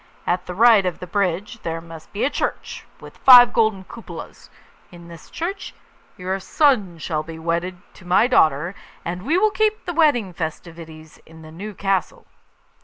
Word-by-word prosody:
At 180 +1 -1
the 180 - -6
right 225 -1 +6
of 180 -2 -2
the - - -8
bridge 200 +4 -2
there 165 0 -4
must 165 -1 -13
be 205 - -3
a 275 - +2
church, - - -4
with - - -13
five 245 -2 +8
golden 220 -4 +1
cupolas; 230 +4 -11 0.4
in 170 -1 -13
this 165 -2 -13
church 375 +4 -5 0.4
your 185 +1 -3
son 205 - +1
shall 155 -1 -3
be 160 +1 -9
wedded 170 +2 -3 0.2
to 185 - -17
my 180 +5 +3
daughter, 160 - +2 0.3
and 175 +1 -4
we 300 - 0
will 425 +3 +3
keep 430 0 0
the 350 - -4
wedding 280 - +2
festivities 160 -1 -8
in 160 0 -15
the 155 - -12
new 200 +5 -8
castle. 195 -2 -2
185 Hz, 175 wpm, -21 LUFS, 165-230 Hz, 0.4 s, five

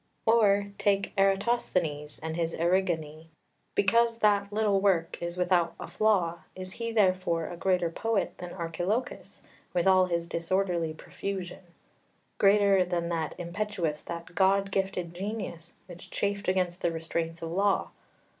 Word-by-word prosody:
5 225 - +5
Or 200 -3 +4
take 200 -1 +1
Eratosthenes 195 -7 +1
and 160 0 -3
his 165 -1 -1
Erigone; 165 -3 0 0.5
because 230 +3 +3
that 205 -2 +2
little 205 -2 +2
work 180 -5 +1
is 170 +1 -4
without 180 -2 +2
a - - -6
flaw, 185 -6 +1 0.2
is 185 0 -5
he 230 +3 -4
therefore 185 -6 +2
a 175 - -6
greater 180 -1 +1
poet 225 +3 -1
than 180 -1 -6
Archilochus, 175 +8 -3 0.3
with 175 - +2
all 185 -1 +5
his 170 -1 -1
disorderly 170 -1 -1
profusion? 190 +2 -6 0.8
greater 200 -1 +5
than 175 -1 -2
that 165 -2 -2
impetuous, 175 -3 -2
that 170 0 -7
god 195 +1 +3
gifted 190 -3 -2
genius, 195 -3 -5
which 175 -2 -11
chafed 200 0 -2
against 185 -1 0
the 170 - +1
restraints 165 0 -3
of 165 - -4
law? 195 +2 +1
185 Hz, 140 wpm, -28 LUFS, 170-200 Hz, 0.8 s, 5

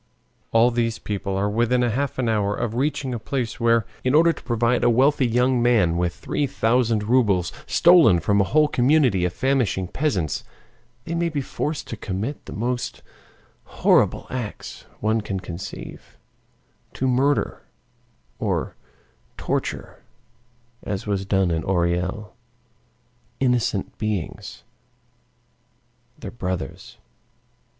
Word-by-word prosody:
All 115 +2 +4
these 115 -1 0
people 100 -2 -3
are 100 +1 +1
within 120 +4 +1
half 125 +4 -1
an 130 -2 0
hour 105 -2 +1
of 120 -2 -3
reaching 135 +1 -1
the 120 - -3
place 120 0 -3
where, 115 -2 +3 0.2
in 130 +3 +2
order 165 +2 +5
to - - -13
provide 120 +1 +1
a 120 - +5
wealthy 130 +2 +3
young 125 +1 +2
man 110 -9 +3
with 85 0 -1
three 145 - -2
thousand 115 -4 +1
rubles 105 -6 +2
stolen 170 - +6
from 100 +5 +2
a - - +2
whole 150 +7 +3
community 125 - +3
of 90 - -2
famishing 125 -8 0
peasants, 100 - -1 0.6
they 170 - -4
may 170 0 0
be 155 -3 -2
forced 150 +2 -3
to - - -4
commit 105 +9 -4
the - - -8
most 125 +3 -3 0.6
horrible - - +2
acts 120 -5 -6
one 110 +1 +1
can 100 -2 -4
conceive, 90 0 -9 0.8
to 130 - -1
murder 135 +3 +1 0.8
or - - -2 0.6
torture, - - -3 0.8
as 100 -2 -4
was 100 -2 -1
done 95 -3 +2
in 80 -1 -1
Orel, 90 +3 -1 1.1
innocent 125 -6 0
beings, 105 -6 -4 1.5
their - - -8
brothers. 90 -6 -5
115 Hz, 125 wpm, -23 LUFS, 100-130 Hz, 1.5 s, stolen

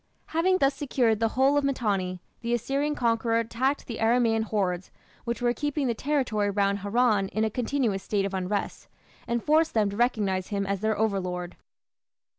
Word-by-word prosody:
Having 370 +3 +3
thus 275 -4 +3
secured 245 -6 +1
the 225 - +2
whole 275 +2 +4
of 290 - +2
Mitanni, 200 -9 -1 0.2
the 235 0 0
Assyrian 275 +5 -1
conqueror 230 -2 +1
attacked 245 +5 -1
the 230 - -6
Aramaean 225 0 +3
hordes 185 -4 -1 0.4
which 235 +1 -3
were 240 0 +3
keeping 290 +1 -2
the 240 - +1
territory 245 -6 0
round 200 0 +1
Haran 205 0 +2
in 215 +3 -1
a 220 - 0
continuous 235 -4 -1
state 195 0 -1
of 195 - -4
unrest, 190 +2 -3 0.4
and 235 -1 -1
forced 315 0 +2
them 210 -2 +2
to - - -6
recognize 205 -6 0
him 200 -1 -2
as 200 0 -1
their 220 0 0
overlord. 180 -4 -2
225 Hz, 175 wpm, -27 LUFS, 200-255 Hz, 0.4 s, whole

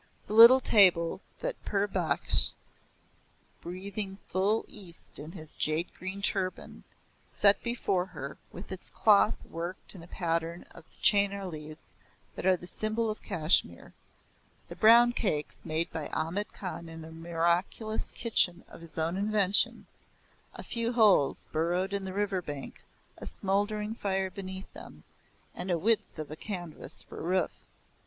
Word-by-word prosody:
The - - -6
little 235 +4 +10
table 185 -8 +4 0.2
that - - -4
Pir 205 0 0
Baksh, 175 -7 +3 1.1
breathing 195 +2 -6
full 200 +4 +1
East 180 -9 -8
in 155 +3 -8
his 155 -1 -10
jade 155 +3 0
green 190 +2 -7
turban, 190 -3 -1 0.4
set 200 -1 +3
before 200 -6 -1
her, 140 -6 -8
with 185 - -10
its 190 - -6
cloth 215 +1 +4
worked 170 +3 -2
in 185 - -11
a 165 - -12
pattern 170 -1 -2
of - - -14
the - - -21
chenar 200 -1 +3
leaves 155 -2 -9 0.4
that - - -3
are 185 -1 +5
the 175 - -11
symbol 215 +4 -1
of 215 - -8
Kashmir; 160 0 0 0.8
the - - -8
brown 235 +2 +7
cakes 155 -11 -2
made 160 +1 -2
by 160 - -4
Ahmad 185 +6 -3
Khan 175 -3 -7
in 165 -1 -9
a 160 - -11
miraculous 170 +6 -1
kitchen 190 -6 +1
of - - -13
his 170 - -13
own 165 +2 0
invention 205 -1 +1 0.7
a - - -8
few 235 0 -2
holes 205 - +4
burrowed 175 +5 0
in 200 -1 -2
the 190 - -5
river 200 -2 -1
bank, 145 -4 -7 0.4
a - - -4
smoldering 205 +2 -1
fire 190 -3 -2
beneath 190 0 -8
them, - - -12 0.5
and 180 +2 -5
a 175 - +2
width 220 +3 0
of 155 0 -6
canvas 175 -6 -4
for - - -10
a - - -6 0.2
roof. - - -4
190 Hz, 150 wpm, -29 LUFS, 165-205 Hz, 1.1 s, little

